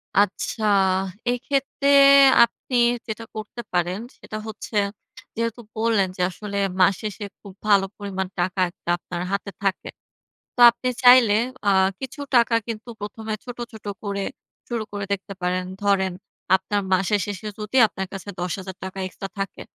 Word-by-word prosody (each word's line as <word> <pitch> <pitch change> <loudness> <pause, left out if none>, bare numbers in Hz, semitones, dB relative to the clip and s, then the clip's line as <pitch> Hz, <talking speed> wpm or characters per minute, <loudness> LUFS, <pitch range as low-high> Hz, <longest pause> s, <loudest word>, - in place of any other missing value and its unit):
আচ্ছা, 205 +2 +1 0.7
এক্ষেত্রে 275 +2 -1 0.6
আপনি 235 +2 -3 0.3
যেটা 220 +1 -5
করতে 215 +2 -6
পারেন। 180 +2 0 0.2
সেটা 215 - -7
হচ্ছে 220 +1 -8 0.6
যেহেতু 230 +1 -2 0.2
বললেন 220 -3 +2
যে, - - -2
আসলে 200 +2 -6 0.2
মাস 190 +1 +6
শেষে 210 0 -5 0.2
খুব 200 -2 -11
ভালো 200 -2 +5
পরিমাণ 190 -2 -3
টাকা 180 +2 -1
একটা 175 -1 -11
আপনার 175 0 -6
হাতে 200 0 -2
থাকে। 195 -1 -1 0.7
তো - - -10
আপনি 255 +2 -3
চাইলে 245 -4 +8 0.3
আ - - +5 0.3
কিছু 265 +2 -7 0.2
টাকা 235 -1 +5
কিন্তু 225 +1 -6
১ম 210 +2 -7
এ - - 0
ছোট, 245 -1 -7
ছোট 220 -2 -13 0.2
করে 200 -1 -2 0.4
শুরু 235 -2 -2
করে 205 -1 -4
দেখতে 200 0 -5
পারেন। 180 +1 0 0.2
ধরেন 190 -2 +2 0.4
আপনার 205 +2 -1
মাসের 195 +3 +2
শেষে 205 0 -5
যদি 210 +5 -2
আপনার 190 -1 -5
কাছে 195 +1 -7
৳১০,০০০ 190 +1 -5
এক্সট্রা 195 +1 -8
থাকে, 195 0 -4
205 Hz, 145 wpm, -23 LUFS, 190-225 Hz, 0.7 s, চাইলে